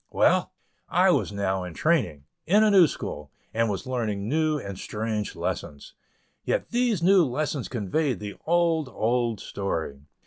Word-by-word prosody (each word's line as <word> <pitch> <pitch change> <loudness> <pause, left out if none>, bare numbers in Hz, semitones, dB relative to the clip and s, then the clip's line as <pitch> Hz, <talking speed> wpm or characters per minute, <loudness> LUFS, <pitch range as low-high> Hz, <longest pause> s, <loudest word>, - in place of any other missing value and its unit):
Well! - - +2 0.4
I - - +4
was - - +1
now 95 -2 -1
in 90 -2 -8
training, 125 - +1 0.2
in 205 +5 +5
a 215 - +4
new 185 -5 +7
school, 75 - -6 0.2
and 115 0 +1
was 100 -2 -3
learning 110 -6 -2
new 155 +3 +1
and 100 -8 -7
strange 110 -1 -3
lessons. 70 -1 -5 0.5
Yet, - - -1
these 235 -7 +1
new 190 0 +6
lessons 145 0 -2
conveyed 125 - -1
the 105 -1 -6
old, 165 -4 +2
old 120 -2 0
story. 80 -10 -4
120 Hz, 150 wpm, -26 LUFS, 100-160 Hz, 0.5 s, new